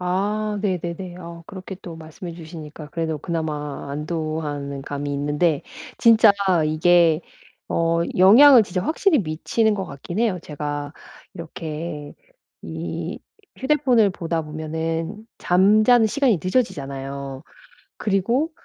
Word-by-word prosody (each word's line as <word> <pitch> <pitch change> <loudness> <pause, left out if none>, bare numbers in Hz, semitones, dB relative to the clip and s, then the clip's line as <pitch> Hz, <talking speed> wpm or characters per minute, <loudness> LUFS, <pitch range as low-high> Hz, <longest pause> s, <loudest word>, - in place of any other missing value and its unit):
아 205 +4 -1
네네네. 180 -1 -3
어 170 -1 -9
그렇게 190 -1 -8
또 170 -3 -8
말씀해 160 +2 -9
주시니까 160 -2 -10
그래도 160 -2 -2
그나마 150 -4 -4
안도하는 150 -2 -4
감이 145 0 -4
있는데 145 +2 0 0.4
진짜 225 -2 +6 0.3
이게 165 +1 +4 0.5
어 165 0 +1 0.2
영향을 235 +7 +8
진짜 180 -2 -3
확실히 315 - +2
미치는 205 +6 0
것 190 -2 -3
같긴 165 +5 -7
해요. 220 -6 +1
제가 145 -1 -5 0.4
이렇게 155 -2 -6 0.5
이 - - -5 0.4
휴대폰을 260 -6 +3
보다 165 -2 -3
보면은 160 +6 -4
잠자는 215 +6 +4
시간이 255 -4 +2
늦어지잖아요. 140 - -3 0.5
그리고 230 - 0
170 Hz, 265 characters per minute, -22 LUFS, 155-205 Hz, 0.5 s, 영향을